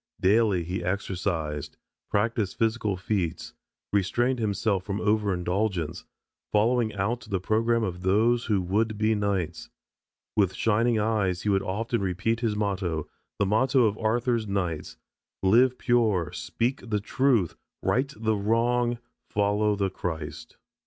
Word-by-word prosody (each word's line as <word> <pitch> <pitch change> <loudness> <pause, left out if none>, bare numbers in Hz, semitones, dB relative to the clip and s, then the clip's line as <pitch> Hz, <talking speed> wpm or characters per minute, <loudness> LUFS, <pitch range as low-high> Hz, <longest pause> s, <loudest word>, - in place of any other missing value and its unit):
Daily 100 -2 +3
he 90 +2 -4
exercised, 90 -5 -2 0.3
practiced 105 -1 0
physical 110 -4 0
feats, 95 -3 -2 0.4
restrained 120 +6 +1
himself 100 -2 0
from 100 +1 -3
over 105 -1 +1
indulgence, 90 -2 -1 0.5
following 115 +2 +2
out 110 +5 -1
the 95 -3 0
program 115 +4 +1
of 90 -4 -3
those 115 +6 +2
who 100 -4 +1
would 105 +4 0
be 110 +1 +2
knights. 100 -5 -2 0.7
With 95 -3 +2
shining 115 +1 +2
eyes 105 -4 0
he 105 - 0
would 95 -1 +3
often 115 +4 -2
repeat 95 +5 0
his 115 -3 0
motto, 95 -7 -1 0.3
the 100 - +2
motto 125 +5 +3
of 105 -1 +1
Arthur's 115 0 0
knights: 85 -10 -3 0.5
"Live 120 +6 +4
pure, 110 -10 +2
speak 120 +1 -2
the 105 -1 +1
truth, 115 - +1 0.3
right 135 +3 +1
the 110 0 +1
wrong, 120 +3 +1 0.3
follow 105 +1 +1
the 100 -2 -1
Christ." 80 -5 -5
105 Hz, 130 wpm, -27 LUFS, 95-115 Hz, 0.7 s, Live